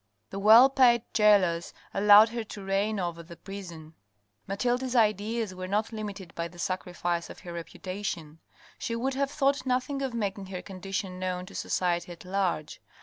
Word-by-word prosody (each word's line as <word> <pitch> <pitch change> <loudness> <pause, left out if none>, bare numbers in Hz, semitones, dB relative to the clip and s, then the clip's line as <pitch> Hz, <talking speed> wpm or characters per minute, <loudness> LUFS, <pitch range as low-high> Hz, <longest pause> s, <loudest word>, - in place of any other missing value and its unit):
The 195 - -4
well 220 +6 +8
paid 250 -4 +4
gaolers 195 -6 +3 0.2
allowed 210 +2 +7
her 230 0 -4
to 205 -2 -9
reign 200 +2 0
over 170 -2 -3
the 170 +1 -12
prison. 170 -5 -9 0.5
Mathilde's 245 +5 -1
ideas 215 -1 +1
were 185 0 -6
not 210 +4 -1
limited 205 -5 -6
by 170 0 -3
the 175 - -16
sacrifice 175 -1 -2
of - - -11
her 175 - -8
reputation. 170 -2 -6 0.4
She 230 - -3
would 260 +4 -1
have 275 +1 0
thought 280 0 +1
nothing 260 +2 -1
of 265 -3 -3
making 200 -3 -3
her 185 -1 -6
condition 190 0 -5
known 185 -1 -3
to - - -13
society 175 0 -1
at 175 - -11
large. 180 -5 -2
195 Hz, 165 wpm, -28 LUFS, 180-225 Hz, 0.5 s, well